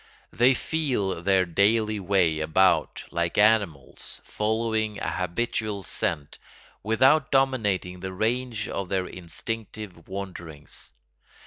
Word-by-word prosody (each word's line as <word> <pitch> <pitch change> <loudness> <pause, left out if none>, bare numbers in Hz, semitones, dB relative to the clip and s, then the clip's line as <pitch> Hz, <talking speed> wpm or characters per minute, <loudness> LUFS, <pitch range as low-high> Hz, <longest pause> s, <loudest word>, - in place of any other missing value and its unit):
They 125 +3 +5
feel 125 - -1
their 95 0 +3
daily 105 +4 +2
way 90 -5 +2
about 80 +5 +2
like 85 0 -1
animals, 100 -10 +1
following 110 -1 -1
a - - -3
habitual 100 +2 -2
scent, 70 -3 -3 0.4
without 130 +7 +3
dominating 105 -10 +1
the 95 +1 -5
range 115 +2 -1
of 95 -2 -4
their 95 -2 0
instinctive 100 +1 -6
wanderings. 90 -6 -7
100 Hz, 105 wpm, -26 LUFS, 90-115 Hz, 0.4 s, They